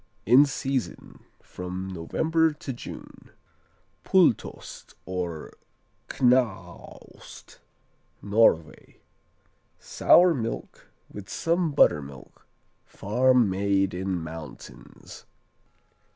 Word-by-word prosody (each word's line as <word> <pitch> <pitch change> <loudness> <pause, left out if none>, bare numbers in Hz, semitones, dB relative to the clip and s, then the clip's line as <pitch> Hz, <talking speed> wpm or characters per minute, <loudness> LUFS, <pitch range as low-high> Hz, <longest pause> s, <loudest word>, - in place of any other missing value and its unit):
In 130 +7 +6
season 135 -8 -5 0.2
from 90 +1 -7
November 160 - 0
to 145 -2 -7
June. 120 - -11 0.7
Pultost 180 - 0
or 90 -4 -5 0.6
Knaost 125 -5 -3 0.6
Norway 100 -6 0 0.8
Sour 175 0 +4
milk 115 -5 -6 0.2
with 100 -1 -10
some 170 -1 -1
buttermilk, 70 - 0 0.4
farm 125 +3 +1
made 95 0 0
in 95 +1 -3
mountains. 80 -2 -11
105 Hz, 70 wpm, -25 LUFS, 90-135 Hz, 0.8 s, In